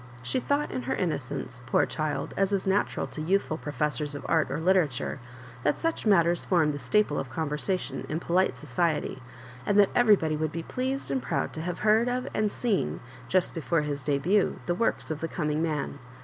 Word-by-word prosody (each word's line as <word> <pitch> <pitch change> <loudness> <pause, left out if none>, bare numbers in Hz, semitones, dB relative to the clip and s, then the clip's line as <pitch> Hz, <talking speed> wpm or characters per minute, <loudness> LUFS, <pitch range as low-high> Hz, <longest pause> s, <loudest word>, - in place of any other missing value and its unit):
She 255 - 0
thought, 285 +3 0
in 130 - -2
her 130 - +1
innocence, 140 -6 -3
poor - - +3
child, 155 -2 -3
as 195 0 +1
is 195 -2 0
natural 195 +1 +1
to 155 - -7
youthful 180 0 +1
professors 150 +1 -2
of 145 - -7
art 160 -2 +2
or - - -2
literature, 160 -7 +1 0.4
that 150 - +1
such 330 -8 -1
matters 175 -4 +4
form 165 -5 +3
the 145 - -5
staple 145 +5 +2
of 135 - -4
conversation 155 +6 -2
in 155 - -1
polite 180 +2 +1
society, 150 -1 -1 0.4
and 200 +10 +1
that 205 -2 +6
every 235 -4 +6
body 160 -4 -1
would 155 0 -1
be 165 +1 -4
pleased 260 - -3
and 135 -2 0
proud 120 - -2
to 160 - -5
have 175 +1 -3
heard 220 +3 +4
of 250 +1 -2
and 215 -1 +1
seen, 200 - -1 0.3
just 185 +5 +2
before 165 0 0
his 145 -1 -3
ddnit, 150 +9 +2
the 175 - +1
works 185 -3 0
of 155 - -3
the 165 - -2
co'hiing 150 -3 -1
man. 150 -3 -2
165 Hz, 195 wpm, -28 LUFS, 150-195 Hz, 0.4 s, that